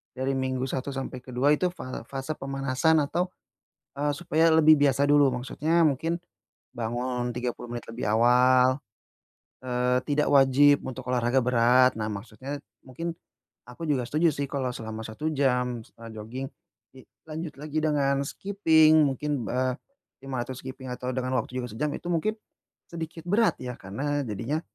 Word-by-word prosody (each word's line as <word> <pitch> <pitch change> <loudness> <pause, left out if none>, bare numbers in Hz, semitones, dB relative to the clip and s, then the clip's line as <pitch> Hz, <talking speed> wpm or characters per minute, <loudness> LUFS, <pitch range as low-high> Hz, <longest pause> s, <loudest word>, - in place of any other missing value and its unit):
dari 130 +1 -1
minggu 130 -1 -1
1 130 +1 -3
sampai 130 -1 -5
ke-2 130 +3 +1
itu 180 +5 +1
fal 130 -7 -7
fase 135 +3 -4
pemanasan 135 +3 +1
atau, 175 +6 -1 0.7
eee, 145 +1 +1
supaya 165 0 +2
lebih 155 -1 +7
biasa 140 0 +3
dulu, 145 -2 +5
maksudnya 150 +7 0
mungkin 160 +5 -1 0.6
bangun 120 +1 -2
30 120 0 -4
menit 120 - -5
lebih 115 +2 -4
awal, 125 +3 +4 0.8
eee, 125 0 +1
tidak 150 0 +1
wajib 140 +1 +6
untuk 130 0 -6
olahraga 125 +1 +2
berat. 125 +1 +5
Nah, 110 - -2
maksudnya 120 +7 -6 0.3
mungkin 165 +7 -4 0.6
aku 125 +7 -8
juga 130 -4 +1
setuju 160 +2 +3
sih 140 0 -3
kalau 135 -2 -2
selama 110 -1 -6
1 110 +8 -4
jam 125 -4 +1
misalnya 115 +1 -13
joging, 125 +5 -5 0.5
dilanjut 155 +4 -9
lagi 155 +1 -3
dengan 145 -3 +2
skiping 160 -5 +4
mungkin, 140 -1 -2
eee, 130 +2 0 0.5
500 130 -1 -4
skiping 130 0 -7
atau 125 +1 -4
dengan 130 0 -2
waktu 125 +2 -4
juga - - -5
sejam 135 +8 -1
itu - - -10
mungkin 195 +6 0 0.6
sedikit 165 -1 -7
berat, 220 +4 +3
ya, 125 -1 -4
karena 145 +10 -2
jadinya 115 +8 -2
130 Hz, 150 wpm, -27 LUFS, 125-150 Hz, 0.8 s, lebih